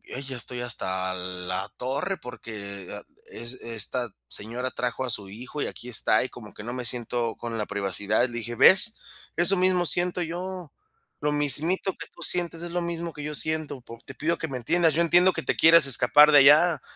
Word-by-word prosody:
"Ay 130 - -2
ya 130 -2 -5
estoy 120 +1 -5
hasta 95 -6 -2
la 90 +1 -5
torre, 140 +10 -3
porque 100 -6 -8
a - - -6 0.3
e - - -9
es 120 - -7
esta 115 +1 -4 0.2
señora 120 - -4
trajo 125 +1 -3
a - - -4
su 100 -4 -1
hijo 125 +8 -8
y - - -2
aquí 125 - -8
está, 110 -2 +1
y 130 - -5
como 105 -3 -12
que - - -10
no 120 - -5
me 125 -1 -5
siento 120 -1 -2
con 115 -1 -6
la 105 - -2
privacidad", 100 +4 -1
le 120 - -12
dije: 120 +1 -6
"¿Ves? 195 - +7 0.4
Eso 175 +3 +2
mismo 180 -1 +2
siento 180 0 +2
yo, 180 0 -6 0.5
lo 150 0 0
mismito 150 +7 +2
que - - -9
tú - - -16
sientes 170 0 0
es 175 - -6
lo 175 0 -2
mismo 170 0 -4
que 150 - -9
yo 150 0 -5
siento. 155 -4 -1
Pues, 115 0 -13
te 135 - -10
pido 160 +7 -1
que 160 - -5
me 135 -4 -5
entiendas 165 +5 +1
yo 170 - +2
entiendo 175 +2 +4
que - - -4
te - - -1
quieres 165 -1 +7
escapar 150 +4 +5
de 145 - +7
allá, 150 +4 +5
130 Hz, 210 wpm, -25 LUFS, 115-170 Hz, 0.5 s, Ves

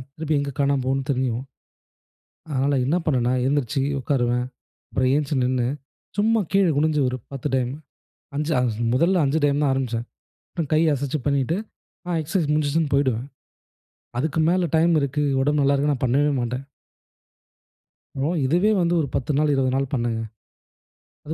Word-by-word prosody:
திருப்பி 160 -1 -1
எங்க 140 0 -3
காணாம 140 -1 +2
போகும்னு 135 +1 0
தெரியும். 125 -2 -1 1.1
அதனால 140 0 +1
என்ன 145 +6 +1
பண்ணன்னா, 125 -4 +2
எழுந்திரிச்சி 140 -1 0 0.2
உட்காருவேன். 125 -2 0 0.4
அப்புறம் 130 0 +1
எழுந்திரிச்சி 145 -1 0
நின்னு 125 -1 +1 0.5
சும்மா 220 +2 +3
கீழ 195 0 +4
குனுஞ்சு 150 0 +2
ஒரு 130 - -3 0.2
10 135 +1 -3
டைம். 125 -1 0 0.7
5 150 +2 -1
அஞ் 125 -2 +1 0.2
முதல்ல 170 +7 +3
5 140 +3 +1
டைம் 145 +1 +1
தான் 145 - +3
ஆரம்பிச்சேன். 120 -3 -2 0.5
அப்புறம் 165 -5 -3
கை 155 - +4
அசைத்து 140 +2 -2
பண்ணிட்டு, 140 +2 +1 0.5
ஆ, 175 -2 0
எக்சசைஸ் 155 0 -1
முடிஞ்சிச்சுன்னு 150 0 +1
போயிடுவேன். 130 -4 +1 0.9
அதுக்கு 155 +4 -1
மேல 180 -1 +2
டைம் 170 +2 +4
இருக்கு, 140 +1 -1 0.2
உடம்பு 145 +1 +2
நல்லா 140 +1 +3
இருக்குன்னா, 145 +1 +1
நான் 130 - -1
பண்ணவே 140 +4 +2
மாட்டேன். 125 +2 -3 1.5
அப்பறம், 155 +5 0
இதுவே 175 +10 +3
வந்து 170 0 +2
ஒரு 145 - -1
10 135 +3 -1
நாள், 150 0 +2
20 130 -1 +1
நாள் 135 -1 -1
பண்ணேங்க. 120 -3 -1 1.1
அது 155 - -4
140 Hz, 150 wpm, -23 LUFS, 130-155 Hz, 1.5 s, கீழ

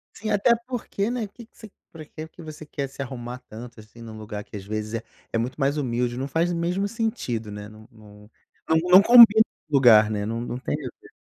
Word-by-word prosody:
Sim, 215 - -5
até 205 +4 +3
porque, 225 -4 -3
né, 240 -3 -3
que 230 +4 -14
que - - -32
você 220 -3 -13 0.2
pra 155 -2 -11
que 155 +1 -9
que 165 - -15
você 155 -1 -10
quer 140 -2 -5
se 135 - -9
arrumar 125 -2 -7
tanto 115 +1 -10
assim 110 +2 -15
num 110 -1 -10
lugar 105 -1 -7
que, - - -13
às 100 - -7
vezes, 110 +1 -4
é 115 - -4 0.3
é 115 - +1
muito 125 +5 -3
mais 140 +1 +1
humilde? 120 -3 -2
Não 135 - -3
faz 165 +5 0
mesmo 175 +4 -1
sentido, 165 - -3
né? 105 0 -8
Não 110 +1 -15
não 105 -2 -17 0.4
não 160 - +4
não 185 +2 +9
combi 235 -1 +9 0.3
lugar, 120 -7 +6
né? 105 -1 -3
Não 115 +2 -3
não 120 0 -5
tem 130 - -3
o 140 -5 -7
que - - -18
130 Hz, 230 wpm, -24 LUFS, 110-175 Hz, 0.4 s, não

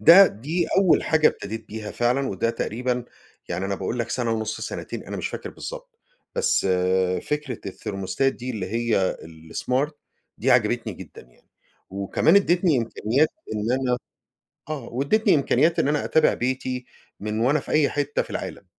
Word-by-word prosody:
ده 185 +4 +9
دي 155 - -2
أول 185 -4 +4
حاجة 160 -1 +5
ابتديت 110 +2 -6
بيها 110 -1 -6
فعلًا 125 +3 +1
وده 100 +4 0
تقريبًا 125 +2 -2 0.4
يعني 90 +2 -2
أنا 100 0 -1
باقول 105 +6 -3
لك 115 0 -2
سنة 120 -2 -1
ونص 110 -1 -2
سنتين، - - -5
أنا - - -5
مش - - -2
فاكر - - -6
بالضبط، - - -9 0.4
بس 480 -1 +2 0.6
فكرة 150 -5 -3
الثيرموستات 95 +7 -1
دي 125 +1 -6
اللي 105 -6 -3
هي 115 -2 +1 0.4
الsmart 135 +4 0 0.5
دي 130 - +1
عجبتني 120 -2 +2
جدًا 90 -2 -11
يعني، - - -26 0.4
وكمان 100 - +3
أديتني 175 -6 +3
إمكانيات 120 +5 +1 0.3
إن 105 +3 0
أنا 130 -1 +1 0.7
آه، 140 -6 -4
واديتني 185 - +3
إمكانيات 155 +4 +3
إن 140 - +2
أنا 150 0 +1
أتابع 160 - +4
بيتي 130 0 -2 0.3
من 105 +1 -3
وأنا 135 +6 +3
في - - -8
أي 155 -2 +4
حتة 145 0 0
في - - -8
العالم. - - -5
125 Hz, 160 wpm, -24 LUFS, 110-150 Hz, 0.7 s, ده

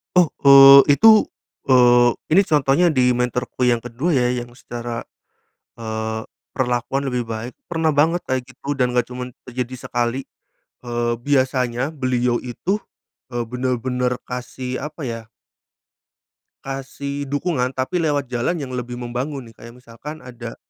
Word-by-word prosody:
Oh, 180 -3 +4 0.2
eee, 140 +1 +9
itu, 220 +5 +6 0.4
eee, 120 -2 +6 0.2
ini 185 +5 +6
contohnya 150 +3 +3
di 130 -5 +3
mentorku 125 +1 -1
yang 120 -1 +1
ke-2 130 +8 -1
ya, 125 -1 +2
yang 120 -1 -3
secara, 120 -2 -6 0.7
eee, 110 -1 -4 0.3
perlakuan 125 +1 -1
lebih 125 -2 -2
baik. 115 +2 -5 0.2
Pernah 165 -2 0
banget 160 +4 +2
kayak 130 -1 -3
gitu 135 +2 -7
dan 125 -3 0
gak 125 0 0
cuman 125 -1 -7
terjadi 125 0 -6
sekali. 120 +2 -1 0.6
Eee, 120 -1 -1
biasanya 130 -1 0
beliau 125 -2 0
itu, 130 - -2 0.6
eee, 120 -1 -2
benar-benar 125 0 -2
kasih 125 +1 -6
apa 150 +1 -8
ya 115 -1 -6 1.4
kasih 140 +1 -5
dukungan, 140 -3 -1
tapi 130 +8 -1
lewat 145 -3 0
jalan 120 +8 0
yang 130 - -6
lebih 125 0 -4
membangun 125 +3 -4
nih, - - -25
kayak 115 0 -12
misalkan 125 +5 -10
ada, 120 -2 -9
125 Hz, 135 wpm, -21 LUFS, 120-140 Hz, 1.4 s, eee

